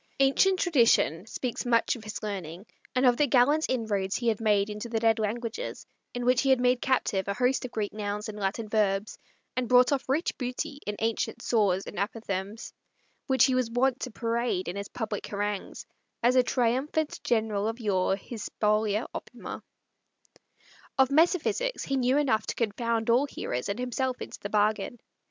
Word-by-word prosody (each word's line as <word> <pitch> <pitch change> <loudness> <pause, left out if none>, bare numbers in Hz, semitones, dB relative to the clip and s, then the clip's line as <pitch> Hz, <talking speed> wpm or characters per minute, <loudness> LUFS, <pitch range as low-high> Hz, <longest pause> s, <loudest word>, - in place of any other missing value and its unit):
Ancient 275 +8 +4
tradition 230 - +3
speaks 245 +1 -3
much 235 0 +2
of 230 - -10
his 215 0 -6
learning, 190 -3 -5 0.3
and 255 +1 +3
of 245 -1 +5
the 295 - +3
gallant 285 +5 +4
inroads 205 -6 -1
he 235 -1 +1
had 220 -1 -1
made 205 -2 +3
into 210 +2 -6
the 225 - -1
dead 225 0 +3
languages, 225 +2 -3 0.3
in 245 0 -2
which 250 0 +4
he 270 - +1
had 260 -2 +5
made 250 0 +2
captive 200 -7 0
a 200 - -1
host 250 +2 +1
of 250 - -6
Greek 210 -3 -3
nouns 210 0 -3
and 210 -1 -7
Latin 205 +3 -2
verbs, 205 -1 0 0.4
and 250 -2 -1
brought 250 +1 +6
off 275 -2 -1
rich 300 +6 0
booty 280 +4 -4
in 210 - -2
ancient 225 0 -2
saws 200 -5 +2
and - - -6
apothegms, 200 0 -4 0.5
which 265 -1 +5
he 260 - +1
was 255 -2 +1
wont 255 +2 +1
to 255 - -4
parade 230 -4 -1
in 175 - -4
his 200 0 -4
public 215 -3 -4
harangues, 205 -1 -4 0.4
as 245 +2 +4
a 255 - +7
triumphant 260 +6 0
general 220 -3 0
of 225 +2 -3
yore 195 -4 +1
his 215 +2 -7
spolia 215 +1 +1
opima. - - -7 1.4
Of 265 0 +4
metaphysics 350 - +2
he 275 - -1
knew 260 +1 +2
enough 240 -7 +1
to - - -2
confound 230 0 0
all 260 +5 +3
hearers 125 - -4
and 200 - -2
himself 250 +1 -2
into - - -8
the 205 - -5
bargain. 210 +2 +1
230 Hz, 180 wpm, -28 LUFS, 210-255 Hz, 1.4 s, a